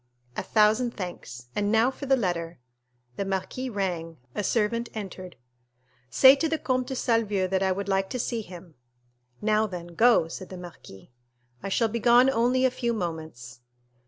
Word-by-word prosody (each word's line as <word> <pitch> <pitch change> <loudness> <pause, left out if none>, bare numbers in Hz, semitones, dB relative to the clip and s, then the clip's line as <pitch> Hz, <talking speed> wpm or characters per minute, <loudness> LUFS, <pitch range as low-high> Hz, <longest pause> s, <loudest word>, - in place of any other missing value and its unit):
"A - - -2
thousand 220 +3 +2
thanks—and 175 - -4
now 225 +3 +3
for 275 +1 -8
the 270 - +5
letter." 170 -6 -2 0.6
The - - -1
marquis 195 +7 -3
rang, 175 -6 -3 0.2
a 210 - -2
servant 230 +3 0
entered. 185 -4 -7 0.7
"Say 265 - +7
to 320 +3 0
the 320 - 0
Comte 255 -3 -1
de 265 - -4
Salvieux 220 -6 +1
that 190 0 0
I 190 -1 +2
would 195 +1 -3
like 195 -1 0
to - - -3
see 230 0 -2
him." 175 -4 -12 0.7
"Now, 215 0 +2
then, 175 -3 -8
go," 230 -4 +4
said 185 +3 -8
the 185 - -8
marquis. 170 - -12 0.5
"I 195 - -4
shall 230 +4 +2
be 230 +2 -3
gone 245 +3 +5
only 250 +1 +2
a 260 - +3
few 240 -2 -2
moments." 160 - -6
205 Hz, 170 wpm, -26 LUFS, 180-235 Hz, 0.7 s, Say